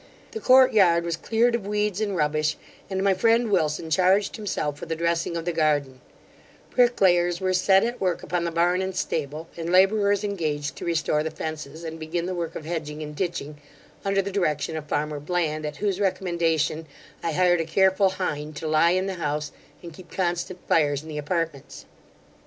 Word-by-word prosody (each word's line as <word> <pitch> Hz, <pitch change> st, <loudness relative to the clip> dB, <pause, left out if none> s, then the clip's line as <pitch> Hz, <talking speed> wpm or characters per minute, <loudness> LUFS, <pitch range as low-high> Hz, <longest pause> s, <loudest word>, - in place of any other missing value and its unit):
The 445 Hz, -, -5 dB
court 260 Hz, -7 st, +6 dB
yard 175 Hz, -5 st, +4 dB
was 170 Hz, -1 st, -2 dB
cleared 230 Hz, +7 st, +1 dB
of 225 Hz, -4 st, -2 dB
weeds 210 Hz, -1 st, -1 dB
and 205 Hz, -3 st, -1 dB
rubbish, 155 Hz, -1 st, 0 dB, 0.3 s
and 190 Hz, 0 st, -2 dB
my 200 Hz, -1 st, +4 dB
friend 230 Hz, +4 st, +2 dB
Wilson 160 Hz, -3 st, 0 dB
charged 190 Hz, +4 st, +3 dB
himself 150 Hz, -9 st, -3 dB
with 165 Hz, -, -8 dB
the 165 Hz, -, -1 dB
dressing 170 Hz, +1 st, -1 dB
of 165 Hz, -, -5 dB
the 175 Hz, -, 0 dB
garden; 145 Hz, -5 st, 0 dB, 0.7 s
bricklayers 180 Hz, -8 st, +3 dB
were 185 Hz, -1 st, 0 dB
set 190 Hz, +1 st, +4 dB
at 240 Hz, +2 st, -3 dB
work 185 Hz, -2 st, 0 dB
upon 175 Hz, +2 st, -1 dB
the 170 Hz, -, -1 dB
barn 175 Hz, +2 st, +1 dB
and 190 Hz, -1 st, -3 dB
stable; 155 Hz, -2 st, -3 dB
and 170 Hz, 0 st, -4 dB
labourers 200 Hz, +2 st, +4 dB
engaged 155 Hz, -7 st, -2 dB
to -, -, -6 dB
restore 160 Hz, -3 st, +1 dB
the 160 Hz, -, -2 dB
fences, 155 Hz, 0 st, -6 dB
and 160 Hz, 0 st, -6 dB
begin 165 Hz, +2 st, -3 dB
the 185 Hz, -, -3 dB
work 170 Hz, -1 st, -4 dB
of 155 Hz, -, -6 dB
hedging 155 Hz, -2 st, -4 dB
and 150 Hz, 0 st, -8 dB
ditching, 150 Hz, -4 st, -4 dB, 0.4 s
under 195 Hz, 0 st, +1 dB
the 200 Hz, -, -4 dB
direction 160 Hz, -5 st, -1 dB
of 155 Hz, -1 st, -6 dB
farmer 150 Hz, 0 st, -2 dB
Bland, 155 Hz, -1 st, -1 dB
at 150 Hz, -1 st, -7 dB
whose 200 Hz, -2 st, -1 dB
recommendation 170 Hz, -5 st, 0 dB, 0.3 s
I 165 Hz, -, -2 dB
hired 175 Hz, 0 st, +3 dB
a -, -, -3 dB
careful 190 Hz, +3 st, +3 dB
hind 155 Hz, -5 st, -4 dB
to 160 Hz, -, -5 dB
lie 155 Hz, +2 st, +4 dB
in 185 Hz, -, 0 dB
the 195 Hz, -, -2 dB
house, 150 Hz, 0 st, -2 dB, 0.3 s
and 170 Hz, -1 st, -9 dB
keep 175 Hz, +2 st, -14 dB
constant 175 Hz, 0 st, -3 dB
fires 145 Hz, -3 st, +2 dB
in 160 Hz, -, -11 dB
the 150 Hz, -1 st, -4 dB
apartments. 160 Hz, -2 st, -4 dB
170 Hz, 190 wpm, -25 LUFS, 155-190 Hz, 0.7 s, court